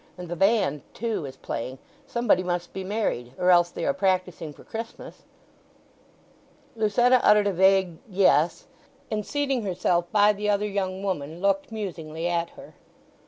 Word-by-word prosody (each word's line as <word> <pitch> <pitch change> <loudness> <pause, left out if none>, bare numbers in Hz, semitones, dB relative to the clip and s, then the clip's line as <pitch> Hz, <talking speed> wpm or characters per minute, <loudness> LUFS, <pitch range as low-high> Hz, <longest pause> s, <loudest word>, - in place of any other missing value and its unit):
And 180 -1 -8
the 175 - -3
band, 195 -7 +2
too, 220 -9 -2
is 130 - -9
playing. 130 +3 -5 0.3
Somebody 235 -7 +2
must 175 -1 -3
be 190 - -5
married; 185 - -2
or 180 0 +3
else 175 -1 +5
they - - -5
are 280 - +2
practising 185 - -1
for - - -15
Christmas." 225 +1 -8 1.5
Lucetta 240 +3 +3
uttered 210 0 +5
a 200 - +1
vague 190 -2 +3
"Yes," 180 -4 +3 0.5
and 210 -1 -1
seating 275 0 -1
herself 175 -3 0
by 210 0 +5
the 210 +1 -2
other 205 0 +1
young 195 -1 -3
woman 165 -4 -3
looked 195 +2 0
musingly 170 -6 -4
at 170 -1 -1
her. - - -12
190 Hz, 155 wpm, -25 LUFS, 175-210 Hz, 1.5 s, else